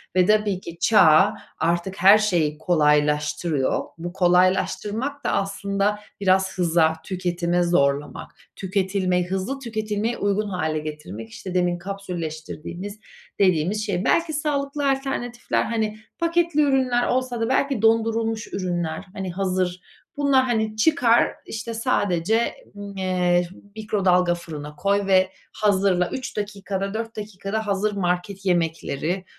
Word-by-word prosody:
ve 185 Hz, -1 st, +5 dB
tabii 210 Hz, -2 st, +2 dB
ki 170 Hz, -2 st, -9 dB
çağ 190 Hz, -1 st, +5 dB, 0.3 s
artık 170 Hz, +3 st, 0 dB
her 195 Hz, +3 st, +8 dB
şeyi 170 Hz, -8 st, +1 dB
kolaylaştırıyor. 150 Hz, -2 st, +1 dB
Bu 175 Hz, +1 st, -6 dB
kolaylaştırmak 190 Hz, +9 st, +1 dB
da -, -, +1 dB
aslında 200 Hz, +1 st, -1 dB, 0.2 s
biraz 190 Hz, 0 st, +2 dB
hıza, 165 Hz, -2 st, +3 dB
tüketime 175 Hz, -1 st, 0 dB
zorlamak, 145 Hz, -4 st, 0 dB, 0.2 s
tüketilme, 190 Hz, -1 st, 0 dB
hızlı 190 Hz, +9 st, -3 dB
tüketilmeye 220 Hz, -2 st, -2 dB
uygun 205 Hz, +1 st, 0 dB
hâle 155 Hz, -5 st, -1 dB
getirmek. 150 Hz, -9 st, -7 dB
İşte 180 Hz, -, -8 dB
demin 175 Hz, -1 st, +1 dB
kapsülleştirdiğimiz 180 Hz, +1 st, -6 dB, 0.4 s
dediğimiz 190 Hz, +2 st, +2 dB
şey. 190 Hz, -3 st, -2 dB
Belki 330 Hz, -1 st, +2 dB
sağlıklı 285 Hz, -1 st, -1 dB
alternatifler, 270 Hz, -3 st, -1 dB
hani, 215 Hz, -1 st, -2 dB, 0.2 s
paketli 335 Hz, -2 st, +2 dB
ürünler 260 Hz, -4 st, +2 dB
olsa 250 Hz, -2 st, -1 dB
da 225 Hz, -, 0 dB
belki 265 Hz, -3 st, +1 dB
dondurulmuş 225 Hz, 0 st, +1 dB
ürünler, 175 Hz, -2 st, -2 dB
hani, 190 Hz, -3 st, -4 dB
hazır. 185 Hz, -1 st, -1 dB, 0.4 s
Bunlar, 280 Hz, -2 st, +4 dB
hani, 220 Hz, -3 st, 0 dB
çıkar, 240 Hz, -2 st, +4 dB, 0.2 s
işte, 225 Hz, +1 st, -5 dB
sadece, 220 Hz, -2 st, +1 dB, 0.4 s
eee, 180 Hz, -2 st, +1 dB, 0.3 s
mikrodalga 190 Hz, -5 st, +2 dB
fırına 150 Hz, -4 st, -8 dB
koy 200 Hz, +4 st, +1 dB
ve 185 Hz, -1 st, +4 dB, 0.2 s
hazırla. 190 Hz, -3 st, +2 dB
3 260 Hz, -3 st, -6 dB
dakikada 200 Hz, -1 st, -3 dB
4 225 Hz, +1 st, -4 dB
dakikada 210 Hz, +1 st, -4 dB
hazır 205 Hz, +1 st, +1 dB
market 190 Hz, +1 st, -2 dB
yemekleri 170 Hz, 0 st, -1 dB
195 Hz, 120 wpm, -23 LUFS, 175-220 Hz, 0.4 s, her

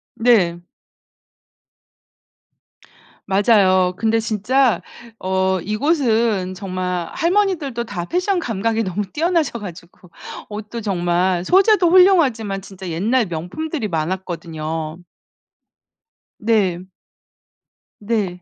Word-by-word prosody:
네. 205 Hz, -8 st, +3 dB, 2.7 s
맞아요. 190 Hz, -2 st, +3 dB
근데 225 Hz, 0 st, +1 dB
진짜 225 Hz, +4 st, +1 dB, 0.4 s
어 190 Hz, 0 st, 0 dB
이곳은 220 Hz, -, +1 dB
정말 180 Hz, -2 st, -3 dB
할머니들도 335 Hz, -, 0 dB
다 205 Hz, -7 st, -5 dB
패션 365 Hz, -, 0 dB
감각이 225 Hz, -, -1 dB
너무 190 Hz, +1 st, -2 dB
뛰어나셔 325 Hz, -5 st, 0 dB
가지고 180 Hz, -2 st, -11 dB, 0.4 s
옷도 215 Hz, +2 st, -6 dB
정말 180 Hz, -2 st, 0 dB
소재도 385 Hz, -, +4 dB
훌륭하지만 285 Hz, -, +4 dB
진짜 190 Hz, -1 st, -9 dB
옛날 215 Hz, +8 st, +1 dB
명품들이 215 Hz, -, -4 dB
많았거든요. 165 Hz, -2 st, -4 dB, 1.4 s
네. 190 Hz, -5 st, 0 dB, 1.1 s
네. 205 Hz, -5 st, -2 dB
205 Hz, 200 characters per minute, -20 LUFS, 180-245 Hz, 2.7 s, 소재도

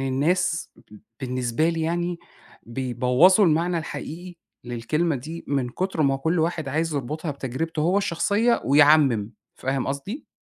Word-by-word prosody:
الناس 165 Hz, +6 st, 0 dB, 0.5 s
بالنسبة 125 Hz, +3 st, 0 dB
لي 165 Hz, -1 st, -1 dB
يعني 175 Hz, +1 st, -1 dB, 0.4 s
بيبوّظوا 125 Hz, -, +3 dB
المعنى 170 Hz, +1 st, +2 dB
الحقيقي 175 Hz, +2 st, -7 dB, 0.3 s
للكلمة 140 Hz, +7 st, -1 dB
دي 160 Hz, +7 st, -8 dB
من 135 Hz, -3 st, 0 dB
كتر 180 Hz, +5 st, -2 dB
ما 135 Hz, -1 st, +3 dB
هو -, -, -3 dB
كل 160 Hz, +5 st, 0 dB
واحد 160 Hz, -2 st, -1 dB
عايز 160 Hz, +3 st, -1 dB
يربطها 150 Hz, +4 st, -3 dB
بتجربته 145 Hz, +4 st, -4 dB
هو 180 Hz, +5 st, +3 dB
الشخصية 205 Hz, +5 st, +1 dB
ويعمّم، 140 Hz, -6 st, +4 dB, 0.2 s
فاهم 135 Hz, 0 st, -2 dB
قصدي؟ 140 Hz, -, -5 dB
155 Hz, 135 wpm, -24 LUFS, 135-170 Hz, 0.5 s, ويعمّم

